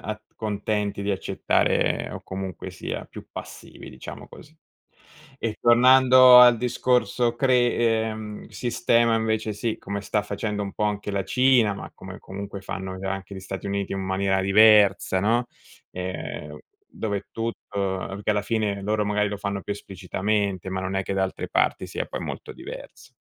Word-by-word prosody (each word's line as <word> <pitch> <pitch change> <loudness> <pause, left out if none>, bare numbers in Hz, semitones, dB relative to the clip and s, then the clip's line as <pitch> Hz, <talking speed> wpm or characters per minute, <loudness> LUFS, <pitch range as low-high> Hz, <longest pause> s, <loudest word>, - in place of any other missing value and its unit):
a 110 0 -5
contenti 105 -1 -2
di 100 - -1
accettare 95 - 0
o - - -7
comunque, 95 -1 -6
sia - - -5
più - - -12
passivi, - - -10
diciamo 65 - -9
così. 155 +2 -15 0.8
E 110 -4 -3
tornando 130 +1 +7
al 125 -1 +8
discorso 125 0 +1
cre 125 -2 +3
ehm, 110 -2 -1
sistema, 120 -1 +1
invece, 110 -1 -1
sì, 110 +2 -2
come 100 +1 -5
sta 105 +1 0
facendo 105 0 -3
un 100 -1 -5
po' 105 - -2
anche 105 -1 -2
la 100 -1 -1
Cina, 125 -5 +3
ma - - -8
come, 95 +1 -10
comunque, 100 +1 -7
fanno 95 -1 -5
c 95 - -8
anche 95 +1 -4
gli 95 - -7
Stati 95 +1 -6
Uniti, 100 -1 -2
in 95 - -2
maniera 95 0 0
diversa, 100 -1 +5
no. 115 +5 +2 0.5
Ehm, 90 0 -6 0.3
dove 100 -3 -4
tutto 100 -4 -4
che - - +2
alla 105 -1 +1
fine, 105 -2 -1
loro 105 +1 0
magari 105 0 +1
lo 105 - -4
fanno 100 0 -4
più 100 - -3
esplicitamente, 100 0 -2
ma 95 0 -2
non 95 +1 -3
è 95 - 0
che 95 - -4
da 95 - +1
altre 95 - -3
parti - - +1
sia - - -4
poi - - -6
molto - - -6
diverso. - - -10
105 Hz, 165 wpm, -24 LUFS, 95-115 Hz, 0.8 s, al